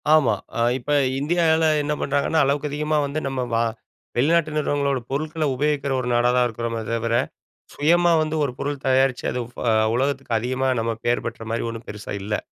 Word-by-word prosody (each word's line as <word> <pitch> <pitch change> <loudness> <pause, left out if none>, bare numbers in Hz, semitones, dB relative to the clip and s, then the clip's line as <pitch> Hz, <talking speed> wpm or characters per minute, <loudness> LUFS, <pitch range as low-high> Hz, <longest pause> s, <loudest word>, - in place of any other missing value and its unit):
ஆமா. 135 -9 +4 0.2
அ - - +1 0.2
இப்ப 130 +3 -5 0.3
இந்தியால 160 +1 +2 0.2
என்ன 150 +1 -1
பண்றாங்கன்னா, 145 +3 +1
அளவுக்கு 145 +2 0
அதிகமா 150 +1 0
வந்து 140 +2 -2
நம்ம 135 -1 -2
வா 115 0 +3 0.5
வெளிநாட்டு 155 +4 +3
நிறுவனங்களோட 140 -2 0
பொருட்களை 155 +3 -1
உபயோகிக்கிற 140 0 0
ஒரு 125 - -3
நாடா 120 +1 +3
தான் 125 - +4
இருக்கிறோமே 115 0 -4
தவிர, 115 0 -1 0.6
சுயமா 170 +3 +3
வந்து 155 0 -2
ஒரு 135 - -2
பொருள் 140 -1 -3
தயாரிச்சு, 130 -1 +2
அது 125 - -2
ஃப - - -5 0.3
உலகத்துக்கு 135 -2 0
அதிகமா 130 +3 -1
நம்ம 115 0 -1
பேர் 120 +1 +1
பெற்ற 115 -1 -5
மாரி 115 - -1
ஒண்ணும் 115 0 -8
பெருசா 105 -1 -6
இல்லை. 105 +1 -2
135 Hz, 170 wpm, -23 LUFS, 120-150 Hz, 0.6 s, ஆமா